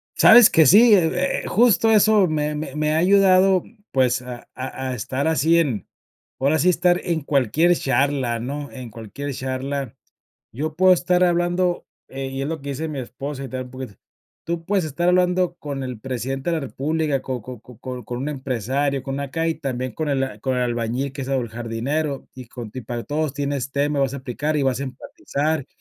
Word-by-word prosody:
Sabes 230 0 +8
que 160 - +5
sí, 215 - +7
eh 180 -1 +2
eh, - - -4
justo 225 0 +4
eso 215 -2 +5
me 150 -1 -1
me 150 -2 -5
me 150 0 0
ha 155 - +2
ayudado, 190 0 +4 0.3
pues, 130 -2 +2
a 125 -1 -9
a 130 0 -5
a - - -3
estar 130 +5 -2
así 160 +1 +3
en 125 - -1 0.5
ahora 145 +4 +2
sí 180 - +4
estar 175 0 +3
en 170 -3 -1
cualquier 145 +5 +2
charla, 135 -3 0
¿no?, 140 +4 -5
en 130 -3 -8
cualquier 115 +6 -7
charla. 130 0 -4 0.6
Yo 155 +5 -4
puedo 185 +1 +6
estar 180 0 +3
hablando, 175 +1 +1 0.2
eh, 135 0 -5
y 135 0 -4
es 140 - -2
lo 160 -2 -4
que 140 - -5
dice 155 +4 -3
mi 145 -3 -4
esposa, 135 +3 -6
y 135 - -6
tal 130 -1 -5
poquito: 130 -4 -8 0.5
"Tú 170 0 -3
puedes 195 -1 +1
estar 165 +4 -1
hablando 180 -1 +2
con 140 -4 -5
el 125 -4 -6
presidente 135 +4 -3
de 165 - +1
la 160 - -2
república, 145 +1 -1
con 130 -2 -4
con 125 -1 -9
con 120 -1 -16
con 125 -2 -7
con 120 +2 -5
un 135 +4 -3
empresario, 135 0 -2
con 135 - -4
una 140 0 -4
calle, 165 +2 0
también 130 -5 -4
con 155 +4 -3
el 135 -6 -1
con 130 +2 -1
el 125 - +1
albañil 120 +3 -2
que 135 - -6
es 130 - -6
o 135 - +1
el 120 - -4
jardinero, 125 +6 -3
y 130 -1 -10
con 120 -4 -8
ti 130 - -7
para 120 -1 -5
todos 150 -1 -2
tienes 140 -2 -2
tema, 145 0 0
vas 135 -1 0
a - - -4
aplicar, 140 +4 -2
y 145 - +1
vas 130 -2 +1
a 140 - -2
empatizar, 140 +3 -3
140 Hz, 205 wpm, -22 LUFS, 130-160 Hz, 0.6 s, Sabes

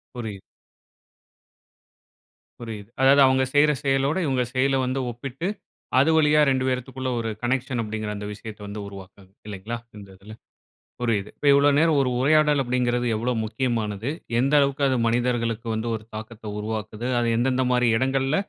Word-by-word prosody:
புரியுது. 110 -5 -6 2.2
புரியுது. 110 -3 -8
அதாவது 140 +1 +6
அவங்க 130 0 +3
செய்ற 150 +1 +5
செயலோடு, 135 +4 +1
இவங்க 130 -3 +1
செயலை 135 +1 +2
வந்து 130 +1 -1
ஒப்பிட்டு 135 +8 -5 0.5
அது 160 +4 +4
வழியா 150 -1 +4
2 130 -1 +1
பேருத்துக்குள்ள 130 0 -3
ஒரு 115 -1 -2
கனெக்ஷன் 125 0 -1
அப்படிங்கற 110 -1 -4
அந்த 105 0 -6
விஷயத்தை 105 0 -10
வந்து 100 +1 -6
உருவாக்குறது 95 -1 -12 0.2
இல்லைங்களா? 105 +3 -5 0.2
இந்த 100 - -11
இதுல. 105 +3 -12 0.7
புரியுது, 110 -4 0
இப்ப 145 - -2
இவ்வளோ 140 +1 +5
நேரம் 160 -1 +3
ஒரு 130 - +1
உரையாடல் 150 +1 +4
அப்படிங்கறது 125 -1 0
எவ்வளோ 120 +3 -1
முக்கியமானது, 110 -1 -2 0.3
எந்த 135 +4 +1
அளவுக்கு 140 0 +1
அது 130 -1 +1
மனிதர்களுக்கு 115 -1 0
வந்து 110 +2 -3
ஒரு 110 - -7
தாக்கத்த 110 +1 -9
உருவாக்குது. 110 +1 -5
அது 120 - 0
எந்தெந்த 130 +1 +1
மாரி 125 -1 +3
இடங்கள்ல, 135 +3 +1
125 Hz, 145 wpm, -24 LUFS, 110-135 Hz, 2.2 s, அதாவது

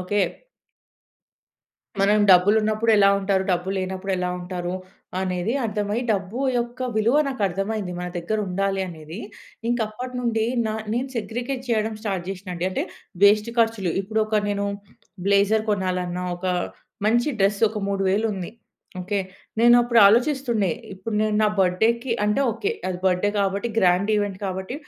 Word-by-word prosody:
Okay. 205 +3 0 1.8
మనం 205 +2 +4
డబ్బులున్నప్పుడు 215 +4 +4
ఎలా 200 -1 +6
ఉంటారు? 195 -1 +1
డబ్బులు 180 +2 0
లేనప్పుడు 190 +1 -3
ఎలా 180 0 -1
ఉంటారు? 175 0 -4 0.4
అనేది 185 +2 -1
అర్థమై 210 0 -1
డబ్బు 200 +3 -1 0.2
యొక్క 240 +1 -4 0.2
విలువ 230 +6 +3
నాకర్థమైంది. 200 -4 -2
మన 180 - -4
దగ్గర 175 +6 -2
ఉండాలి 195 +1 -1
అనేది. 160 +1 -9 0.5
ఇంక 240 +1 +1
అప్పటినుండి 240 0 -2 0.2
నా 215 - -1 0.2
నేను 250 +3 -1
సెగ్రిగేట్ 245 +4 -3
జేయడం 220 -1 0
స్టార్ట్ 195 -5 -3
జేషినండి. 180 -2 -5
అంటే 185 - -1 0.4
వేస్ట్ 210 +2 +5
ఖర్చులు 225 -7 +2
ఇప్పుడొక 215 +1 0
నేను 200 0 -1 0.6
బ్లేజర్ 200 +2 +3
కొనాలన్నా, 180 -2 -1
ఒక 180 +2 -5 0.6
మంచి 240 +5 +3
డ్రెస్ 200 +1 +2
ఒక 215 0 -5
మూడు 195 -1 -1
వేలుంది. 200 -3 -1 0.5
ఓకే? 200 +2 -1 0.4
నేనప్పుడు 240 0 +5
ఆలోచిస్తుండే. 240 -2 +2 0.2
ఇప్పుడు 195 +4 -5
నేను 215 -1 +1
నా 215 - +4
బర్త్‌డేకి 225 +7 +1
అంటే 210 +5 +1
ఓకే. 405 - -2 0.2
అది 180 -1 -3
బర్త్‌డే 185 +2 +2
గాబట్టి, 200 +3 0
గ్రాండ్ 185 +1 +3
ఈవెంట్ 205 -2 -1
కాబట్టి 190 +4 -4
205 Hz, 135 wpm, -23 LUFS, 185-225 Hz, 1.8 s, ఎలా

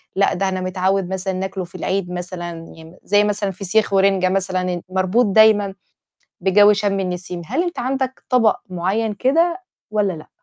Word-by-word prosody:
لأ 200 +1 +2
ده 195 +1 0
أنا 185 0 -3
متعوّد 185 0 0
مثلًا 190 0 -2
ناكله 190 0 -4
في 175 - -13
العيد 190 -2 -2
مثلًا 175 -1 -5 0.3
ي 160 +2 -14
زي 205 +1 +3
مثلًا 205 -1 -1
فسيخ 200 +3 0
ورنجة 195 -1 +3
مثلًا 185 -1 0
ن 180 -1 -2
مربوط 190 +6 +2
دايمًا 205 -1 +4 0.7
بجو 205 +3 +5
شَم 200 -1 0
النسيم. 180 -1 -4
هل 270 - -1
أنت 350 -1 -4
عندك 260 +1 -2
طبق 235 -5 +4
معيّن 195 +5 -1
كده 330 - +1 0.3
والّا 205 -3 +1
لأ؟ 155 -2 -11
195 Hz, 165 wpm, -20 LUFS, 185-210 Hz, 0.7 s, بجو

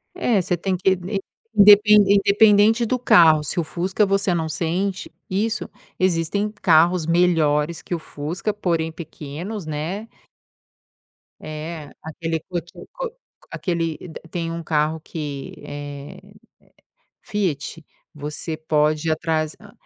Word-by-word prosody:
É, 240 - +2
você 180 0 -1
tem 185 +2 -1
que 190 +1 +2
in 190 +2 -2 0.4
indepen 210 0 +8
independente 205 +3 +5
do 250 +3 0
carro, 165 -10 +6
se 160 +5 -2
o - - +1
Fusca 185 +6 0
você 195 0 +1
não 165 -2 -1
sente 180 +5 -2 0.2
isso, 215 +3 -1 0.3
existem 185 +3 +1
carros 170 0 +4
melhores 165 -2 +2
que 175 - -3
o - - -5
Fusca, 160 +7 -4
porém 165 -5 -1
pequenos, 160 +5 -7
né 160 +8 -4 1.3
É, 155 0 -7
aquele 160 +1 -3
cot 175 -1 -4 0.2
co - - -4 0.4
aquele 165 -4 -2 0.3
tem 165 -2 -3
um 170 0 -5
carro 155 0 0
que 150 -4 -6
eh, 145 0 -8 1.0
Fiat, 165 -5 -3 0.3
você 150 +2 -5
pode 155 0 +1
ir - - +3
atrás 155 -1 -1
hã. 210 -2 -15
170 Hz, 125 wpm, -22 LUFS, 155-200 Hz, 1.3 s, indepen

